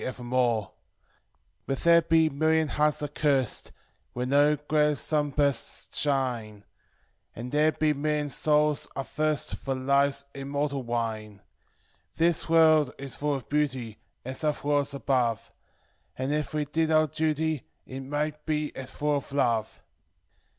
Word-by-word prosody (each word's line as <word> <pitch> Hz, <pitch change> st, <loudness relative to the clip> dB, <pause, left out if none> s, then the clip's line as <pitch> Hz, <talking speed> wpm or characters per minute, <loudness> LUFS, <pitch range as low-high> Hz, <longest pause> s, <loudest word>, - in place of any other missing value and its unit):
evermore: 120 Hz, -4 st, -1 dB, 1.0 s
But 135 Hz, -, -1 dB
there 170 Hz, 0 st, +6 dB
be 160 Hz, 0 st, +3 dB
million 155 Hz, +1 st, +1 dB
h< -, -, -5 dB
rsed, 150 Hz, -3 st, +1 dB, 0.4 s
when 125 Hz, +1 st, -3 dB
no 145 Hz, +2 st, +4 dB
glad 150 Hz, 0 st, +1 dB
sunbursts 145 Hz, -4 st, -1 dB
shine. 120 Hz, -8 st, -1 dB, 0.7 s
And 120 Hz, +2 st, -6 dB
there 150 Hz, +1 st, +3 dB
be 155 Hz, -1 st, +1 dB
million 150 Hz, 0 st, -1 dB
souls 150 Hz, +1 st, +1 dB
athirst 150 Hz, +2 st, -1 dB
for 135 Hz, -1 st, -3 dB
Life's 140 Hz, +1 st, +1 dB
immortal 140 Hz, 0 st, -2 dB
wine. 110 Hz, -4 st, -4 dB, 0.7 s
"This 165 Hz, 0 st, +1 dB
world 155 Hz, -4 st, +5 dB
is 135 Hz, -1 st, -6 dB
full 145 Hz, 0 st, -1 dB
of 130 Hz, -4 st, -7 dB
beauty, 130 Hz, -7 st, -1 dB, 0.3 s
as 130 Hz, +1 st, -5 dB
othei 150 Hz, -2 st, -1 dB
worlds 145 Hz, -1 st, +1 dB
above; 125 Hz, -5 st, 0 dB, 0.7 s
And, 130 Hz, +3 st, -1 dB
it' 150 Hz, 0 st, -2 dB
we 150 Hz, -1 st, -1 dB
did 160 Hz, +2 st, 0 dB
our 155 Hz, 0 st, +4 dB
duty, 155 Hz, -1 st, -1 dB, 0.2 s
it 130 Hz, -, -7 dB
might 150 Hz, +2 st, -3 dB
be 150 Hz, -1 st, -1 dB
as 130 Hz, -1 st, -6 dB
full 150 Hz, +1 st, 0 dB
of 140 Hz, -, -7 dB
love." 115 Hz, -6 st, 0 dB
145 Hz, 130 wpm, -27 LUFS, 130-150 Hz, 1.0 s, there